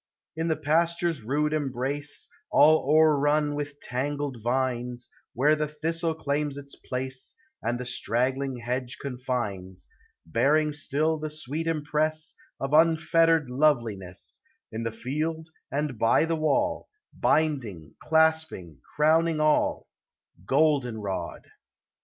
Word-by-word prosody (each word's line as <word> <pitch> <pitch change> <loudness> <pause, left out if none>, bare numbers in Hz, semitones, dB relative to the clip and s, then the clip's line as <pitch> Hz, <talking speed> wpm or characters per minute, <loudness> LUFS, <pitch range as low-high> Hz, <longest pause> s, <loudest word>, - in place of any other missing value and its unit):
In 160 +1 -2
the 160 - +2
pasture's 165 +1 0
rude 150 +7 0
embrace, 145 0 -3 0.2
All 155 -1 +5
o'errun 150 -1 +4
with 145 -1 -5
tangled 140 -1 -3
vines, 125 0 -2 0.3
Where 145 +5 +4
the 150 0 -1
thistle 160 +2 -2
claims 145 -2 -2
its 140 0 -10
place, 130 0 -5 0.3
And 120 +1 -1
the 125 - -5
straggling 130 +2 -1
hedge 125 +1 -4
confines, 120 -9 -4 0.4
Bearing 150 - +2
still 155 +2 0
the 155 0 -4
sweet 155 +2 -5
impress 155 0 -1 0.3
Of 135 +1 -3
unfettered 165 -2 +4
loveliness, 115 -10 -1 0.3
In 110 +1 -4
the 115 0 -2
field 155 +8 -3 0.2
and 140 -4 -2
by 115 +7 +4
the 165 0 0
wall, 285 - 0 0.2
Binding, 120 - 0
clasping, 160 - +1 0.2
crowning 160 +1 +3
all, 155 0 +2 0.3
— 90 - -28
Goldenrod 125 -9 0
145 Hz, 115 wpm, -27 LUFS, 125-155 Hz, 0.4 s, All